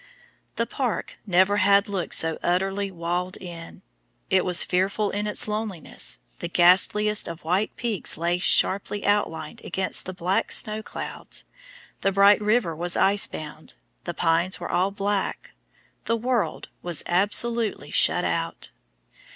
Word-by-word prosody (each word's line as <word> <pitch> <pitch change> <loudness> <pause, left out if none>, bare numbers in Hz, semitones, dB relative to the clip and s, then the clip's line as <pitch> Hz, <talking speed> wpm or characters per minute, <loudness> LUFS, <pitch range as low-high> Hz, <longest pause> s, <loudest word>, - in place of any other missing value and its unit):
The 230 - 0
park 240 -7 -4
never 190 +2 +3
had 200 +1 +4
looked 195 -4 -2
so 160 0 +2
utterly 195 +3 0
walled 180 +1 -3
in; 170 -2 -10 0.5
it 185 -1 +4
was 180 -1 +4
fearful 195 +3 0
in 205 +1 -2
its 210 - -1
loneliness, 210 - -2 0.2
the - - -4
ghastliest 205 +4 +3
of 170 -1 -8
white 185 +6 0
peaks 225 -7 -1
lay 170 +2 0
sharply 200 +2 +2
outlined 165 -7 -1
against 190 -1 -1
the 185 - -5
black 180 +1 -1
snow 215 0 +1
clouds, - - -5 0.6
the 195 - +1
bright 200 +2 +5
river 210 -6 +1
was 175 +2 -1
ice 200 +1 +3
bound, 155 0 -9 0.3
the 175 - -4
pines 170 +3 +1
were 175 - -5
all 185 +2 +2
black, 200 0 -3 0.5
the 230 - 0
world 240 -1 -2
was 175 -2 -2
absolutely 210 +5 +1
shut - - +3
out. - - -3
195 Hz, 140 wpm, -24 LUFS, 175-210 Hz, 0.6 s, bright